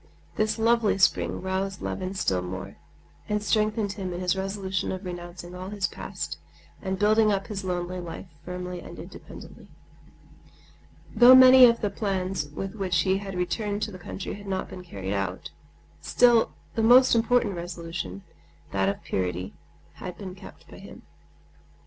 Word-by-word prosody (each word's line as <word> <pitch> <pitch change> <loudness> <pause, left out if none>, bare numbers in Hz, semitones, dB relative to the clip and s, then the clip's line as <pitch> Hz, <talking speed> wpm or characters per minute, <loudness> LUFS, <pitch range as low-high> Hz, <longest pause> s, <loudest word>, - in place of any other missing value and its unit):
This 215 +1 0
lovely 225 -2 +3
spring 190 -1 +2
roused 190 0 -2
Levin 185 +1 -4
still 95 - 0
more, 90 +1 -7 0.5
and 210 0 0
strengthened 215 -1 +1
him 190 -2 -5
in 175 - -4
his 180 0 +1
resolution 190 -1 -2
of 185 +1 -5
renouncing 175 0 -7
all 185 +1 -7
his 205 -1 -2
past - - -5 0.4
and 190 -1 -2
building 215 +2 +4
up 195 -1 0
his 205 -2 -5
lonely 180 0 -3
life 175 0 -7 0.2
firmly 180 0 -5
and - - -10
independently. - - -11 1.5
Though 250 +1 +9
many 255 0 +10
of 235 -1 +1
the 205 - 0
plans 190 -6 -2
with 190 +6 -5
which 185 -5 0
he 190 +1 +1
had 195 -2 -7
returned 205 +4 -2
to 215 - -3
the 185 - -10
country 185 +2 -6
had 205 0 -10
not 190 -1 -2
been 180 -1 -8
carried 95 - -5
out, 90 -6 -3 0.5
still 240 -2 +4 0.2
his 225 - 0
most 250 +3 +7
important 235 -2 +2
resolution—that 165 - -5
of 100 - -4
purity—had 90 - -6
been 185 -1 -7
kept 185 - -14
by - - -12
him. - - -12
190 Hz, 155 wpm, -26 LUFS, 175-210 Hz, 1.5 s, many